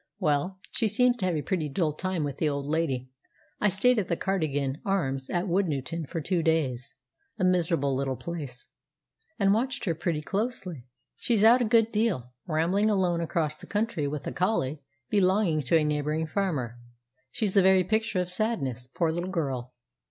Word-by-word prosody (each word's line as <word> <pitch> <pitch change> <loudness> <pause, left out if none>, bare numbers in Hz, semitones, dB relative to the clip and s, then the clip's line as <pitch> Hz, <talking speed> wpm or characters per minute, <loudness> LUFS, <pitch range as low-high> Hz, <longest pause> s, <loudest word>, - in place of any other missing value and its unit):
"Well, 155 +6 0
she 225 - +1
seems 250 +3 +3
to 190 -5 0
have 175 - 0
a 150 - -2
pretty 165 -6 -1
dull 155 +1 0
time 185 0 -2
with 140 -2 -3
the 155 - +2
old 140 -1 -3
lady. 140 -5 -1 0.5
I 210 - +3
stayed 225 +6 +3
at 190 - -2
the 170 - 0
'Cardigan 145 -7 -1
Arms' 135 -9 -1
at 175 +1 0
Woodnewton 165 -4 -1
for 170 - -3
two 170 +3 0
days 140 -5 0 0.4
a - - -1
miserable 170 -6 +2
little 135 0 -1
place 145 -6 -7 0.7
and 200 -3 +4
watched 255 +5 -1
her 170 - +1
pretty 160 -1 -2
closely. 195 - -3 0.3
She's 225 -4 +1
out 240 +3 +7
a - - +3
good 225 0 +3
deal, 185 - 0
rambling 175 +7 +2
alone 180 -4 +1
across 155 -2 -1
the - - -12
country 205 -8 -1
with 145 0 -4
a - - -3
collie 160 -7 0 0.3
belonging 190 -5 +3
to 165 - +4
a 155 - +2
neighbouring 150 +1 0
farmer. 150 - -2 0.5
She's 200 - -1
the 200 - +6
very 190 0 +5
picture 220 +1 0
of 180 - -3
sadness, 160 - -2
poor 165 -2 +2
little 175 +3 -3
girl!" 135 -9 -2
170 Hz, 180 wpm, -27 LUFS, 145-195 Hz, 0.7 s, out